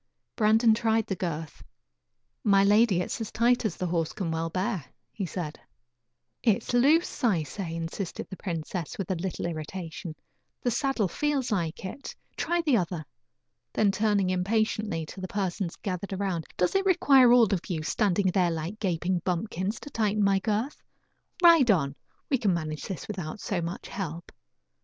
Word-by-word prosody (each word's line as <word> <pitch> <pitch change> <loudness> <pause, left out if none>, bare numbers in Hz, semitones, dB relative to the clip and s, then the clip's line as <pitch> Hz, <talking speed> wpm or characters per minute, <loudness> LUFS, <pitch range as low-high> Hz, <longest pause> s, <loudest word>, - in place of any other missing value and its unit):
Brandon 220 +1 +5
tried 225 0 +1
the 195 - -2
girth. 165 -3 -5 0.8
"My 200 -2 +5
lady, 205 -2 +4
it - - -4
is - - -3
as 220 - -4
tight 240 +1 +2
as 205 - -1
the 185 - -2
horse 165 -2 -1
can 185 -6 -3
well 165 0 -1
bear," 185 0 -1 0.3
he 195 -4 -4
said. 160 -4 -5 0.8
"It 225 -1 +2
is - - -3
loose, 285 +8 +3
I 190 -10 +3
say," 165 +2 -5
insisted 165 +3 -4
the - - -7
princess, 170 -2 -4
with 195 -2 -3
a - - +1
little 180 +1 -3
irritation; 165 0 -5 0.5
"the 245 - +1
saddle 245 -4 +1
feels 280 - -1
like 170 -4 -2
it. 225 +9 -7 0.2
Try 345 0 0
the 285 -7 +4
other." 175 -4 -2 0.7
Then 205 -2 +3
turning 205 -3 +1
impatiently 205 -2 0
to 190 - -9
the 185 - -3
persons 190 -3 -2
gathered 195 0 -4
around: 190 -4 -2
"Does 180 - +2
it 390 - +2
require 275 -9 +6
all 235 -4 +6
of 180 - -3
you, 160 -4 -2
standing 195 +2 +1
there 180 -2 +3
like 165 +6 -4
gaping 180 -1 0
bumpkins, 185 +3 -2
to 290 - -9
tighten 210 -2 +1
my 195 -1 +4
girth? 220 +7 -2 0.6
Ride 330 -7 +7
on; 140 -9 +3 0.3
we 270 - +1
can 200 -6 +2
manage 155 -2 -4
this 190 -5 -5
without 185 -3 -5
so 190 -3 -2
much 170 +3 -5
help." 170 -3 -5
195 Hz, 170 wpm, -28 LUFS, 170-220 Hz, 0.8 s, Ride